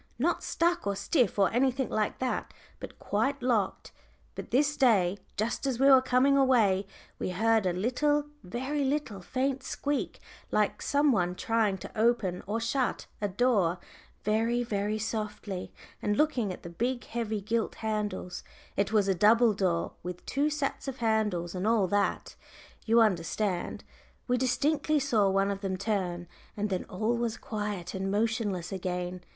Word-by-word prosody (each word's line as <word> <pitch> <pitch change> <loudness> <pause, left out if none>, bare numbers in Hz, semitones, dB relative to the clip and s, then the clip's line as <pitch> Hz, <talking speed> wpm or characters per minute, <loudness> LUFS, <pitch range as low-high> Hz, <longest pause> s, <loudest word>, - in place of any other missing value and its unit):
Not 325 +9 +1
stuck 345 -5 0
or 200 - 0
stiff, 245 - +1
or 195 +1 +3
anything 260 +1 +1
like 215 -1 0
that, 260 -1 -3 0.2
but - - -9
quite 270 +7 -1
locked. 225 -6 0 0.4
But - - -7
this 290 +3 +2
day, 200 -7 +3 0.2
just 230 +6 -1
as 250 -3 -1
we 270 - +4
were 260 -1 +8
coming 260 +2 +3
away, 225 -8 +3 0.3
we - - -2
heard 220 +2 +2
a - - +2
little, 290 +9 +1 0.2
very 260 +10 -2
little, 265 -8 -1
faint 265 +6 -1
squeak, 285 +2 -3 0.3
like - - +1
some 285 0 +3
one 180 -5 +1
trying 220 -2 +1
to - - -9
open 215 -5 +1
or 215 +3 -1
shut 245 +3 -1 0.2
a 205 - +1
door 200 -4 +2 0.5
very, 225 +3 +1
very 210 -1 -1
softly, 210 -3 -4 0.3
and 210 0 0
looking 260 -10 +1
at 180 - -9
the 170 - -7
big 245 +7 -2
heavy 225 -2 -3
gilt 225 +3 -1
handles 210 -4 -3 0.3
it 200 +1 0
was 210 -3 +3
a 195 - +3
double 220 +5 +5
door, 185 -4 0
with 180 0 -7
two 285 +3 +1
sets 290 -2 -3
of 265 -1 -4
handles 215 -7 0
and 185 +2 -2
all 225 -3 +3
that, 205 +2 -1 0.5
you 230 +1 +5
understand 190 -1 0 0.4
we 250 - +2
distinctly 285 +4 +1
saw 225 -8 +2
one 195 +1 +2
of 195 0 -4
them 190 -2 -2
turn, 185 -4 -2 0.3
and 205 0 -1
then 185 - -1
all 215 +6 -1
was 235 -1 -2
quiet 205 -5 -4
and 190 0 -2
motionless 205 -4 -1
again. 180 -1 -3
220 Hz, 160 wpm, -29 LUFS, 195-255 Hz, 0.5 s, were